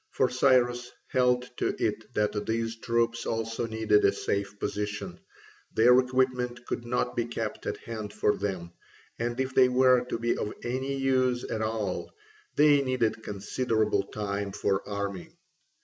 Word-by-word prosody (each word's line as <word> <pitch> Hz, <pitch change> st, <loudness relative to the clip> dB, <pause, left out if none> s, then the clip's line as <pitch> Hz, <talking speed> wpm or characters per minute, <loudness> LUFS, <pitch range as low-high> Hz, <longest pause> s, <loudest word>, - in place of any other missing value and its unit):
For 130 Hz, -, +1 dB
Cyrus 125 Hz, -1 st, +3 dB, 0.2 s
held 125 Hz, -1 st, +3 dB
to -, -, 0 dB
it 110 Hz, +1 st, -2 dB
that 105 Hz, -1 st, 0 dB
these 115 Hz, 0 st, -1 dB
troops 115 Hz, 0 st, 0 dB
also 115 Hz, +1 st, -2 dB
needed 110 Hz, -2 st, +2 dB
a -, -, +5 dB
safe 100 Hz, +1 st, -2 dB
position: 105 Hz, +1 st, -4 dB, 0.6 s
their 125 Hz, +3 st, +7 dB
equipment 125 Hz, -1 st, 0 dB
could 120 Hz, -, -4 dB
not 125 Hz, 0 st, -1 dB
be 120 Hz, -, 0 dB
kept 115 Hz, -2 st, -4 dB
at -, -, -2 dB
hand 110 Hz, -3 st, -6 dB
for 105 Hz, -, +1 dB
them, 90 Hz, -4 st, -4 dB, 0.5 s
and 120 Hz, +2 st, -2 dB
if 130 Hz, 0 st, -1 dB
they 130 Hz, -1 st, +6 dB
were 125 Hz, 0 st, +5 dB
to 125 Hz, -, -3 dB
be 120 Hz, +1 st, 0 dB
of 105 Hz, -, -4 dB
any 130 Hz, +3 st, -2 dB
use 130 Hz, -2 st, +1 dB
at 110 Hz, -, -3 dB
all 110 Hz, -4 st, -2 dB, 0.4 s
they 145 Hz, -1 st, +6 dB
needed 125 Hz, -4 st, 0 dB
considerable 110 Hz, +2 st, 0 dB
time 100 Hz, -1 st, -3 dB
for 95 Hz, 0 st, 0 dB
arming. 100 Hz, -2 st, -4 dB
115 Hz, 150 wpm, -28 LUFS, 105-125 Hz, 0.6 s, their